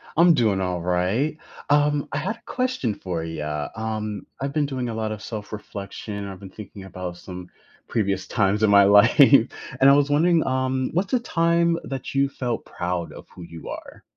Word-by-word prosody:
I'm 170 +1 +6
doing 110 -7 +2
alright. 90 - 0 0.3
Um, 145 0 +3
I 145 - -1
had 210 +10 -2
a - - -23
question 255 - -1
for 90 -4 -4
ya, 75 -2 -4
um, 110 -2 -4
I've 140 +1 -3
been 150 -2 +1
doing 130 -3 -3
a - - -4
lot 110 -1 -2
of 110 -1 -6
self 105 -2 -7
reflection. 100 -1 -6
I've 95 -2 -8
been 95 -1 -11
thinking 100 0 -10
about 90 -2 -7
some 90 0 -9 0.4
previous 100 -4 -1
times 105 -1 +1
in 110 - +4
my 100 0 +7
life, 100 +3 +7
and 135 -1 +5
I - - +8
was 145 0 +3
wondering, 165 +2 +3
um, 130 0 0
what's 185 +4 0
the 250 - +4
time 170 -5 +1
that 135 -2 -5
you 140 0 +2
felt 125 -4 -3
proud 90 -1 -3
of - - -11
who 90 - -12
you 85 -1 -9
are? - - -9
110 Hz, 190 wpm, -24 LUFS, 95-140 Hz, 0.4 s, I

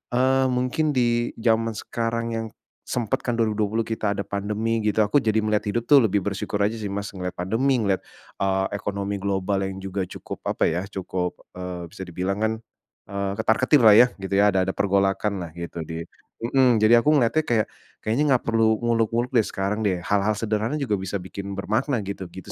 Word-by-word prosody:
eee, 130 +1 +3
mungkin 130 +4 0
di 120 -1 +1
zaman 115 -1 +1
sekarang 115 +2 -2
yang 115 0 -3 0.4
sempat 120 -5 -2
kan 120 - -1
2020 110 0 0
kita 110 -2 -1
ada 100 0 -2
pandemi 105 +3 -1
gitu 105 0 +1
aku 105 +3 +2
jadi 110 0 +2
melihat 105 -1 0
hidup 120 +1 -2
tuh 140 -4 +7
lebih 105 -1 +2
bersyukur 100 +1 -3
aja 105 +3 +1
sih, 105 -3 -5
Mas, 100 +1 -3
ngelihat 90 -1 -4
pandemi, 120 +9 +1
ngelihat, 100 -3 0 0.4
eee, 95 0 +1
ekonomi 100 0 -3
global 95 0 0
yang 95 0 -5
juga 95 0 -3
cukup, - - -9
apa - - +1
ya, 85 +3 -1
cukup, 90 -2 -3 0.3
eee, 90 -1 -5
bisa 95 - -8
dibilang 90 +2 -3
kan, 110 0 +2 0.6
eee, 100 0 -2
ketar-ketirlah 115 -1 +5
ya, 125 +3 +8
gitu 95 0 -5
ya, 105 +1 +5
ada 95 - +1
ada 95 - -1
pergolakanlah 100 -3 0
gitu 85 0 -6
di 80 0 -5 0.4
mmm. 125 0 +4
Jadi 110 +2 +6
aku 130 - +1
ngeliatnya 145 +4 +2
kayak, 110 -3 +2 0.4
kayaknya 115 +7 +1
nggak 125 - -1
perlu 110 -1 +3
muluk-muluk 115 +1 +1
deh 115 -5 +3
sekarang 100 +2 -2
deh, 90 -3 -1
hal-hal 100 +3 +1
sederhana 110 +4 -1
juga 125 -9 -1
bisa 95 +1 -4
bikin 100 +1 -5
bermakna 110 +4 -1
gitu, 95 -1 -5
gitu 95 +3 -10
105 Hz, 185 wpm, -24 LUFS, 95-115 Hz, 0.6 s, ya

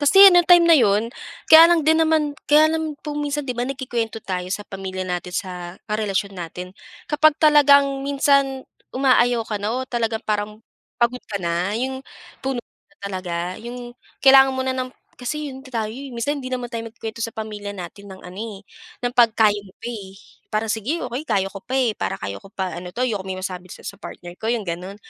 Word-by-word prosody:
kasi 290 +6 +3
yung 355 -2 +6
time 350 -1 +8
na - - +8
yun, 215 -3 +3 0.4
kaya 325 +1 +10
lang 335 -3 +3
din 320 +1 +4
naman 315 -2 +2 0.2
kaya 305 +2 +6
lang 320 -2 -2
po 300 - -4
minsan, 295 0 -2
di 250 - -2
ba 240 - 0
nagkukwento 245 -5 -3
tayo 180 -1 -3
sa 205 - -3
pamilya 190 -1 -5
natin, 180 -1 -3
sa 180 -2 -5
karelasyon 205 -2 -1
natin, 180 +2 -7 0.4
kapag 300 0 +4
talagang 285 -3 +5
minsan, 275 -1 +2 0.3
umaayaw 245 -3 +3
ka 215 - -2
na 210 +2 -1
o 260 - -2
talagang 225 -2 -1
parang 210 0 -2 0.4
pagod 240 +1 +2
ka 205 - -2
na, 175 +4 -1
yung 260 +1 -3 0.4
puno 265 -2 -1
na 195 - -35
talaga, 180 -2 -4
yung 240 +1 -8 0.3
kailangan 270 0 +8
mo 260 - 0
na 260 - 0
ng 255 0 -2 0.3
kasi 295 +3 -4
yun 260 - -9
ta 235 -5 -3
tayo, 215 - -5
eh. 275 +4 -8
Minsan 280 +5 -2
hindi 255 - -5
naman 250 -1 -3
tayo 230 -1 -4
nagkukuwento 225 0 -8
sa 230 - -5
pamilya 210 -2 -5
natin 195 +3 -9
ng 190 - -12
ano, 180 +2 -10 0.2
eh, 195 - -14 0.4
ng 245 - 0
'pag 235 -3 +5
kaya 215 -2 +4
mo 190 - -16
pa, - - -15
eh. 205 -5 -7 0.4
Parang, 215 +1 0
"Sige 230 +9 -2
okey, 250 +5 -5
kaya 195 -2 +1
ko 195 - -8
pa, 255 - -5
eh, 245 -4 +2
para - - -2
kaya 100 0 -5
ko - - -14
pa 190 -2 -3
ano 180 +1 -7
'to, 250 +6 -1
ayokong 205 -6 -3
may 190 - -3
masabi 185 -1 -6
sa - - -12
sa - - -6
partner 175 -1 -9
ko," 220 - -3
yung 230 -3 -2
ganun. 180 +3 -5
230 Hz, 210 wpm, -22 LUFS, 195-270 Hz, 0.4 s, kaya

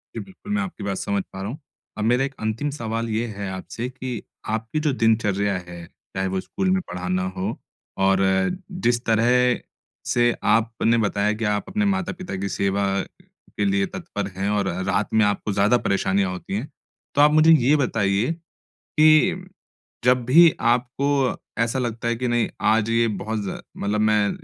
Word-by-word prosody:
जी, - - -3
बिल्कुल 195 +2 -11
मैं 205 - +1
आपकी 195 -3 -6
बात 100 -1 -2
समझ 100 -1 -1
पा 95 - -7
रहा 100 - -3
हूँ, 135 - -6 0.4
अब 105 - -2
मेरा 120 +4 +3
एक 135 0 -7
अंतिम 110 +7 -2
सवाल 115 -4 -3
ये 110 +2 0
है 100 -3 -5
आपसे 105 +6 -5
कि 130 -3 -5 0.3
आपकी 110 +6 -2
जो 150 -1 +1
दिनचर्या 105 -4 +1
है, 90 -1 -9 0.3
चाहे 95 0 0
वो 95 0 -1
स्कूल 190 - -2
में 190 0 +2
पढ़ाना 90 +1 -2
हो, 95 +4 -2 0.4
और 95 0 +3 0.7
जिस 120 0 +1
तरह 120 +2 +3 0.5
से 120 0 +3
आपने 115 +1 +2
बताया 105 -1 +1
कि 110 +1 -3
आप 105 -1 -1
अपने 210 +1 0
माता-पिता 190 - -2
की 100 +1 -3
सेवा 100 +1 0 0.4
के 105 - -6
लिए 100 0 +2
तत्पर 100 0 -5
है 100 +1 -1
और 100 -2 0 0.2
रात 100 +3 0
में 110 0 +5
आपको 105 +1 -1
ज़्यादा 105 +5 +4
परेशानियाँ 95 -3 0
होती 90 +1 -5
हैं। 120 +8 -4 0.5
तो 145 - +5
आप 150 +1 +6
मुझे 155 +1 +6
ये 145 -2 +5
बताइए, 115 -3 +1 0.5
कि 155 +4 +3 0.6
जब 125 0 +4
भी 165 +7 +7
आपको 130 +3 +1 0.3
ऐसा 115 +3 -1
लगता 120 -2 -3
है 120 - +1
कि 125 +2 -2
नहीं, 120 -1 +1
आज 110 +1 +2
ये 115 0 +3
बहुत 110 +1 -3
ज़ 95 - -3 0.3
मतलब 105 +1 -1
मैं 105 -1 +3
115 Hz, 175 wpm, -23 LUFS, 100-130 Hz, 0.7 s, भी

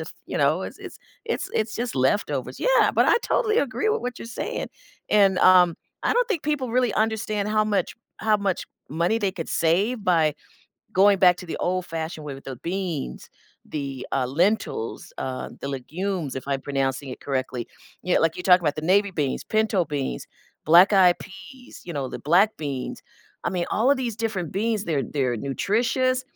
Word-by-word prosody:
f - - -7
you - - -4
know, - - +2
it's - - -7
it's - - -10 0.3
it's - - -2
it's 215 0 0
just 240 0 -3
leftovers. 135 - 0
Yeah, - - +4
but - - +3
I - - +5
totally 440 -2 +1
agree 285 - 0
with 440 +1 +1
what 250 -1 -5
you're - - -8
saying. 230 - -4 0.4
And 195 -3 +4
um, 180 -2 +6 0.3
I - - +2
don't - - +2
think 395 -10 -2
people 295 -5 -1
really 250 -3 +2
understand 215 -2 0
how 215 0 +2
much 210 -2 -1 0.2
how 215 -1 +2
much 200 -3 -2 0.2
money 170 +8 +1
they 200 -3 0
could 165 -3 -6
save 200 +8 +1
by 160 -4 +3 0.6
going 195 +1 +5
back 180 -1 +6
to 180 - -9
the 165 - -4
old-fashioned 165 -3 -3
way 145 - -5
with 135 - -12
the 135 - -6
beans, 175 -5 -4 0.4
the, 140 -3 -5
uh, 135 - +1
lentils, 170 - -1
uh, 130 -1 -4
the - - -5
legumes- 160 +3 -3
if 130 - -5
I'm 140 -1 -1
pronouncing 135 0 -2
it 125 - -7
correctly- 130 -3 -3 0.4
you 180 - +1
kn - - +3
like 165 0 +1
you 180 - -5
talk 180 -1 +6
about 150 -4 -1
the 155 - -4
navy 200 +4 +3
beans, 150 -7 -2
pinto 215 -4 +1
beans, 140 - -4 0.4
black 175 +6 +7
eyed 185 -3 +6
peas, 195 +7 -12
you 175 - -6
know, 140 -4 -3
the - - -6
black 185 +8 +3
beans. 140 -4 -5 0.4
I - - 0
mean, 180 -1 -1
all 235 +6 +2
of 285 - +4
these 245 -4 -3
different 215 -8 -3
beans, 215 +1 0
they're 150 -7 0
they're 130 -4 -1
nutritious 240 - 0
185 Hz, 190 wpm, -24 LUFS, 150-220 Hz, 0.6 s, black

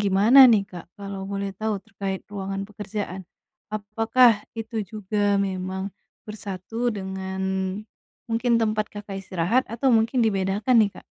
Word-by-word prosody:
gimana 205 +7 +5
nih, 215 -3 +4
Kak, 175 -2 -8
kalau 200 -1 -6
boleh 200 0 -2
tahu, 215 +2 -2
terkait 195 -3 -4
ruangan 195 0 -3
pekerjaan? 205 -2 -5 0.5
Apakah 225 +4 +4 0.3
itu 225 0 -5
juga 205 -1 0
memang 190 0 -2 0.3
bersatu 210 +3 -4
dengan, 190 0 -5 0.9
mungkin 235 +1 +1
tempat 215 -1 +1
Kakak 205 -1 -7
istirahat, 190 +7 +1
atau 260 +4 +1
mungkin 230 +2 +3
dibedakan 200 +3 +1
nih, 205 -2 +3
Kak? - - -12
205 Hz, 130 wpm, -24 LUFS, 195-225 Hz, 0.9 s, gimana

